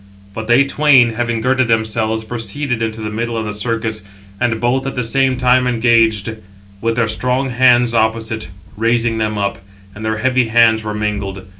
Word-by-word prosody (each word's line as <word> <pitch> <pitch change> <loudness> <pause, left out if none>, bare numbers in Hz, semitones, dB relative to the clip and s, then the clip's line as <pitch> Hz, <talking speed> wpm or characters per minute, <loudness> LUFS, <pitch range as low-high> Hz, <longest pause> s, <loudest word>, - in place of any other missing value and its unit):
But 110 +1 -6
they 120 +4 +4
twain, 140 -4 +4
having 120 0 -2
girded 130 +1 +1
themselves, 110 0 0
proceeded 120 +3 -4
into 110 0 -3
the 105 -1 -4
middle 115 +2 -3
of 110 - -3
the 105 - -4
circus, 110 0 -3 0.4
and 115 -2 0
both 130 +3 0
at 135 - -4
the 125 - -1
same 130 +2 +1
time 125 0 +3
engaged, 115 -2 +2 0.4
with 115 0 0
their 115 -1 +1
strong 125 +4 -1
hands 125 -1 +3
opposite, 110 -1 -1 0.3
raising 115 +1 0
[them 110 -1 -1
up], 100 -1 -2 0.3
and 105 - -10
their 110 0 -1
heavy 130 +1 +1
hands 110 -1 +3
were 105 0 -4
mingled. 100 -3 -4
115 Hz, 175 wpm, -17 LUFS, 110-125 Hz, 0.4 s, they